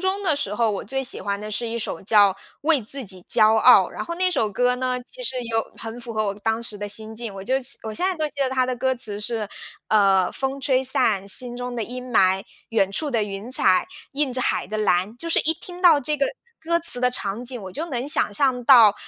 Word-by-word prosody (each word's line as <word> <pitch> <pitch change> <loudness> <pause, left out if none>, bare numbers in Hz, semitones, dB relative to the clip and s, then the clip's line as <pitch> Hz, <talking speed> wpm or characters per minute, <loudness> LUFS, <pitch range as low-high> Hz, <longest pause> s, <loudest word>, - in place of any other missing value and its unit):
中 380 +2 -1
的 320 -6 +2
时 210 -8 -3
候， 225 -1 +1
我 200 - -4
最 270 +5 -4
喜 - - -1
欢 200 0 -3
的 210 +1 -7
是 225 +2 -3
一 235 +1 -4
首 190 - -5
叫 205 -1 +4 0.3
《为 310 -2 +3
自 255 +4 -4
己 185 -2 -7
骄 220 -1 +4
傲》。 220 - +6
然 - - -6
后 340 - -5
那 370 +1 +1
首 245 -11 0
歌 245 +5 +1
呢， 255 0 -2
其 - - -10
实 265 - 0
有 225 -1 -3
很 225 +2 -7
符 235 -2 -8
合 215 0 0
我 200 -1 -2
当 225 +2 -2
时 210 -3 -4
的 205 - -5
心 220 +2 -3
境。 220 -3 -6
我 195 - -8
就 260 +5 +1
现 265 +2 0
我 220 -1 -6
现 360 +12 -2
在 375 - -3
都 310 -1 -1
记 290 - -22
得 265 - +1
它 260 -1 0
的 255 0 -2
歌 260 +2 -1
词 210 -5 -1
是 220 -1 -1 0.4
呃： 195 -3 +3
“风 270 0 -3
吹 265 -1 0
散 205 -6 +2
心 245 +4 -1
中 245 0 -6
的 230 - -2
阴 250 +2 -7
霾， 190 -3 +3 0.3
远 195 -4 +1
处 290 +8 -1
的 230 -3 0
云 205 +3 -6
彩 185 -7 +4 0.3
映 275 -2 -1
着 255 - -2
海 - - -1
的 215 +3 -5
蓝。” 200 0 0
就 335 - -4
是 330 - +2
一 320 - +2
听 355 +2 -12
到 330 -5 +6
这 300 +3 -2
个 280 - +1 0.4
歌 335 +1 +1
词 330 -7 +9
的 250 0 +2
场 215 0 -4
景， 245 -2 -3
我 190 -1 -9
就 320 - -4
能 260 -4 -4
想 285 - +1
象 255 +1 0
到， 230 -6 +7
240 Hz, 275 characters per minute, -22 LUFS, 210-270 Hz, 0.4 s, 词